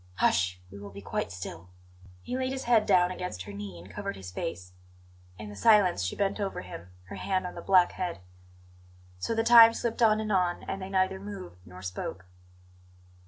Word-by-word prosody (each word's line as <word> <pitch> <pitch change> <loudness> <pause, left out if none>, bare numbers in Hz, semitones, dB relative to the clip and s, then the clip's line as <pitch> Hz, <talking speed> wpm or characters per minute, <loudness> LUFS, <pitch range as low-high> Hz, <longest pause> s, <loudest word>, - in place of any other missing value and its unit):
Hush! 90 -1 +2
We 100 - -10
will 100 0 -9
be 100 0 -11
quite - - -3
still." 90 -2 -8 0.5
He 250 - -4
laid 260 0 -1
his 265 - -4
head 230 -3 +3
down 180 -2 +4
against 180 - -5
her 100 +1 -9
knee 100 -3 -7
and 85 +2 -12
covered 100 - -4
his 95 -2 -9
face. 90 +1 -5 0.6
In 105 +1 -8
the 105 - -9
silence 205 - +4
she 90 - -2
bent 200 +1 -1
over 200 -1 -3
him, 90 -1 -10 0.2
her - - -7
hand 185 -1 -1
on 180 - -5
the 170 - -8
black 185 -1 +4
head. 180 - -4 1.0
So 225 - -2
the 225 - +1
time 230 -1 +8
slipped 235 0 -3
on 215 -2 +5
and 215 -1 -3
on; 180 -3 +1
and 195 - -5
they 190 - -6
neither 190 0 +1
moved 195 - -8
nor 90 +1 -11
spoke. 95 0 -5
180 Hz, 200 wpm, -28 LUFS, -, 1.0 s, time